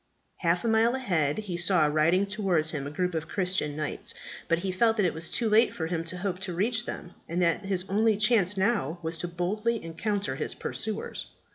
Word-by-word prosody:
Half 175 +3 +1
a - - +2
mile 225 +2 +3
ahead 170 - 0
he 200 -5 -4
saw 175 -2 +3
riding 155 +6 +3
towards 190 -6 0
him 140 -2 -4
a - - -4
group 180 +4 -1
of 160 0 -3
Christian 180 -6 0
knights; 155 0 -2 0.3
but 170 - +2
he 190 - 0
felt 225 +4 +2
that 205 - +3
it 175 - +1
was 160 +1 -3
too 235 - +1
late 220 +2 +4
for 160 - -2
him 165 0 -2
to 180 +2 -2
hope 185 0 -3
to 185 -2 -3
reach 225 +5 0
them, 175 - -6 0.2
and 170 +2 -1
that 170 +3 +1
his 190 -1 0
only 215 +2 +2
chance 210 -3 +3
now 190 - +1
was 160 +1 -2
to 175 - -3
boldly 210 +7 -1
encounter 200 +5 -2
his - - -3
pursuers. 220 -1 -2
185 Hz, 215 wpm, -28 LUFS, 165-210 Hz, 0.3 s, late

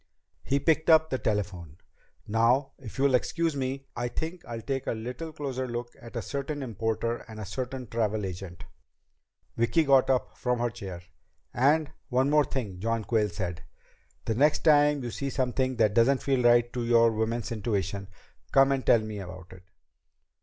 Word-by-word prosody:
He 140 - 0
picked 160 +2 +2
up 160 -1 +6
the 130 - 0
telephone. 95 -7 -3 0.5
"Now, 120 +6 +2
if 120 -6 -10
you'll 135 0 +3
excuse 165 +5 +1
me, 135 0 -3
I 120 0 -2
think 160 +7 -5
I'll 115 -1 -6
take 135 -2 -3
a - - +1
little 125 +8 -6
closer 135 -4 -4
look 120 0 -5
at 115 +1 -12
a 115 - -2
certain 140 +1 -4
importer 115 0 -2
and 110 -2 -9
a 105 - -5
certain 130 +6 -5
travel 110 -2 -1
agent." 90 -2 -7 0.9
Vicki 120 +8 +3
got 135 -3 +4
up 130 -2 0
from 125 -1 -1
her 120 0 -1
chair. 95 -7 -8 0.5
"And 145 +4 +3 0.2
one 130 +2 +2
more 150 -1 +5
thing," 105 -9 -4
John 115 +2 -1
Quayle 105 -1 +1
said. 90 -1 -4 0.6
"The 110 - 0
next 145 +6 +3
time 145 -3 +4
you 120 - -4
see 140 +4 -3
something 130 0 0
that 110 -3 +3
doesn't 125 +5 +3
feel 135 -2 +1
right 120 0 +4
to 125 - -2
your 115 -1 +5
woman's 115 +2 -2
intuition, 100 -3 -2 0.4
come 135 0 +5
and 135 -1 0
tell 115 - +5
me 110 -1 -6
about 90 -1 -9
it." 90 - -13
120 Hz, 175 wpm, -28 LUFS, 110-135 Hz, 0.9 s, up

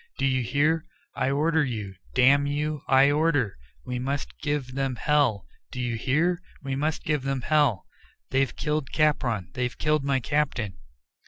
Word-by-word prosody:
"Do - - 0
you 130 -1 +2
hear? 150 +6 +1 0.3
I - - 0
order 155 +3 +2
you; 110 -7 -4 0.2
damn 140 +3 +5
you, 150 0 -2
I 135 +2 +5
order 145 -8 +1 0.3
We 125 0 -3
must 140 +3 -4
give 145 -4 -2
them 135 -1 -1
hell; 135 -7 +1 0.3
do 125 - -6
you 120 -2 -1
hear? 165 +10 +1 0.2
we 135 -1 -2
must 150 +3 -1
give 150 -2 0
them 135 -1 -2
hell. 145 - +2 0.5
They've 135 -2 +1
killed 150 -3 -2
Capron. 120 - +1
They've 125 0 -2
killed 150 -1 +1
my 135 -1 +1
captain." 125 - -1
135 Hz, 160 wpm, -26 LUFS, 125-150 Hz, 0.5 s, damn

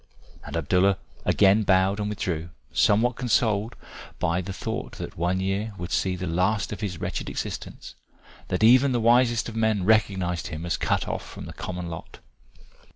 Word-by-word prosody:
And - - -5
Abdallah 90 +5 +2 0.3
again 100 +1 +4
bowed 95 0 +3
and 105 0 -1
withdrew, 85 -5 -3 0.2
somewhat 115 +4 +3
consoled 115 -3 +1 0.4
by 85 +2 0
the 95 +2 -6
thought 95 - -5
that - - -7
one 90 +3 0
year 100 +3 -2
would 90 -2 -6
see 95 -1 +1
the 90 0 -4
last 90 +6 0
of 105 - -7
his 95 -5 -3
wretched - - -3
existence, - - -6 0.5
that - - -1
even 130 +4 +6
the 120 - +1
wisest 120 0 +3
of 115 - -7
men 110 -3 +1
recognised 95 -5 +2
him 80 -1 -6
as 85 - 0
cut - - 0
off - - -3
from - - -9
the - - -8
common 90 -1 -5
lot. 80 -1 -8
100 Hz, 170 wpm, -25 LUFS, 90-110 Hz, 0.5 s, even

